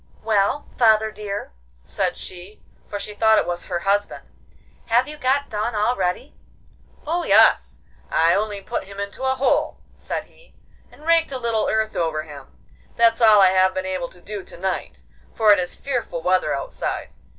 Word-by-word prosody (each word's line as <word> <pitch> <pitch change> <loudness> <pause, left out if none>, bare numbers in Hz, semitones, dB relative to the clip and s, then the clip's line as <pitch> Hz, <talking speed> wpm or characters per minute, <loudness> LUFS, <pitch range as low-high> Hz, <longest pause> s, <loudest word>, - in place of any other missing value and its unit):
'Well, 215 +6 +1
father 220 -2 +4
dear,' 205 - -6 0.3
said 70 - -2
she, 185 +3 -9 0.3
for 205 - -5
she 210 +1 -6
thought 220 +1 +4
it - - +2
was 175 0 -4
her 180 - -2
husband. 205 +2 -1 0.6
'Have 240 +3 +3
you 300 - -7
got 280 0 0
done 215 +2 -3
already?' 210 +2 -1 0.7
'Oh 340 +3 -1
yes, - - +4 0.3
I 165 +1 +3
only 205 -1 -1
put - - -4
him 195 +1 -11
into 200 +4 -6
a 265 0 +1
hole,' 265 +1 0
said - - -5
he, - - -24 0.4
'and 300 - -17
raked 330 -2 +3
a 265 - -3
little 230 -3 0
earth 220 0 0
over 160 -2 -1
him; 145 -3 -11 0.5
that's 230 0 +3
all 215 -3 +7
I 190 - +7
have 185 0 +3
been 185 0 -2
able 185 -2 -3
to 180 - -15
do 205 0 -7
to - - -11
night, 190 +1 -4 0.3
for 215 -2 +6
it 200 - +2
is 175 -1 -3
fearful 240 -11 -4
weather 185 0 +2
outside. - - -4
210 Hz, 175 wpm, -22 LUFS, 185-235 Hz, 0.7 s, all